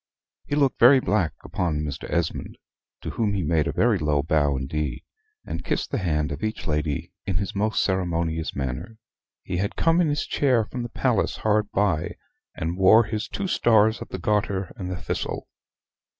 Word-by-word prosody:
He 145 - -1
looked 140 -3 +2
very 130 +3 +8
black 100 - +1
upon 80 -5 -1
Mr. 75 -3 -5
Esmond, - - -2 0.4
to - - -4
whom 105 -3 0
he 95 - -1
made 80 -1 +1
a - - 0
very 115 -4 +2
low 75 -2 +1
bow 75 -3 +2
indeed, 75 +3 -3 0.4
and - - -5
kissed - - -2
the - - 0
hand 75 -6 0
of 70 - -5
each 110 0 -3
lady 75 -2 -2
in 95 - +1
his 100 0 -3
most 105 +2 +1
ceremonious 85 -4 -1
manner. 70 - -4 0.5
He - - -3
had 100 +3 -1
come 165 +1 +3
in 170 - +2
his 145 0 0
chair 125 -6 +2
from 125 +3 -5
the 120 - -4
palace 115 -3 0
hard 105 -1 +1
by, 100 -7 0 0.4
and 85 +3 -3
wore 110 +5 +7
his 110 0 -3
two 200 - -4
stars 110 - +3
of - - -7
the - - -4
Garter 100 0 -1
and 95 -6 -5
the 90 - -3
Thistle. - - -4
95 Hz, 185 wpm, -25 LUFS, 80-110 Hz, 0.5 s, very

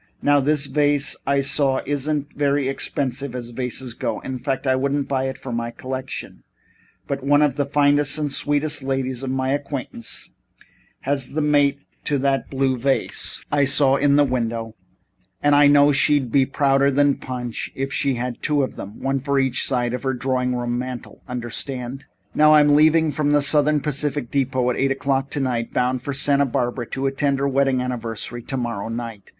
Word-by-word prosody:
Now, 145 0 +4
this 145 +1 +2
vase 145 0 +2
I 140 0 +2
saw 135 -1 +2
isn't 145 +1 -2
very 140 -1 0
expensive 135 -1 -3
as 120 -1 -6
vases 125 0 -4
go - - -3
in 130 -1 -5
fact, 135 +1 -3
I 130 -1 +3
wouldn't 140 +1 -1
buy 130 -1 -1
it 135 0 -4
for 130 - -8
my 115 0 -2
collection 130 +2 -7 0.6
but 140 -1 -4
one 145 +2 +4
of 145 -3 +2
the 145 -1 -1
finest 145 0 +3
and 150 -2 -2
sweetest 145 +1 0
ladies 130 -1 -2
of 135 - -4
my 130 0 -1
acquaintance 140 -4 -4 0.7
has 135 -1 -1
the 155 - 0
mate 145 -1 +2 0.2
to 145 - +1
that 135 -2 0
blue 135 -2 0
vase 135 +2 -1
I 145 -1 +3
saw 135 0 +4
in 140 0 +3
the 145 - +5
window, 115 -4 -2 0.7
and 145 0 +3
I 145 0 +6
know 145 0 +6
she'd 140 -3 +2
be 135 0 +3
prouder 140 0 +2
than 140 0 +2
Punch 125 -3 -5
if 135 +1 -3
she 140 -2 0
had 120 0 -4
two 145 -2 +1
of 130 - -5
them 100 +3 -9
one 135 0 0
for 140 +1 -1
each 130 -2 +1
side 120 -2 0
of 125 - -3
her 130 -1 -1
drawing 125 0 -1
room 120 0 -2
mantel, 125 -4 -7
understand? 125 +1 -4 0.3
"Now, 155 0 +6
I'm 145 -1 +5
leaving 155 +1 +4
from 145 0 0
the 145 - +4
Southern 150 0 +3
Pacific 145 -3 -1
depot 130 -2 0
at - - -4
eight 135 - +1
o'clock 135 0 -1
tonight, 130 -5 -2
bound 125 0 0
for 140 - -4
Santa 140 0 +2
Barbara 120 -1 -2
to 135 0 -4
attend 135 +1 0
her 140 +1 0
wedding 135 -1 +1
anniversary 120 -1 -5
tomorrow 120 -4 -4
night. 115 -3 -6
135 Hz, 185 wpm, -22 LUFS, 125-145 Hz, 0.7 s, I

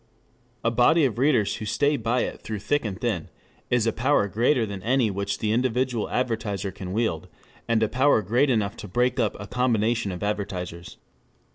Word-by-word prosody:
_] - - -37 0.6
A 115 - +2
body 140 +7 +4
of 120 -3 -1
readers 130 -7 +2
who 110 - -6
stay 145 +7 +1
by 120 0 0
it - - -4
through 110 - -4
thick 145 +8 0
and 100 -3 -4
thin 105 -10 -2 0.4
is 120 -2 +2
a 115 - +1
power 120 -4 +2
greater 115 +4 +2
than 100 -2 -6
any 120 +1 +2
which 100 +1 -2
the 105 - -1
individual 125 -1 0
advertiser 110 -6 -2
can 95 0 -7
wield, 95 -5 -1 0.4
and 115 -1 +2
a - - +3
power 130 -1 +3
great 120 +9 +2
enough 105 -5 0
to - - -8
break 125 +6 +1
up 110 -4 0
a 100 - -6
combination 115 -3 0
of 90 +2 -6
advertisers. 90 -4 -4
110 Hz, 190 wpm, -25 LUFS, 100-125 Hz, 0.6 s, body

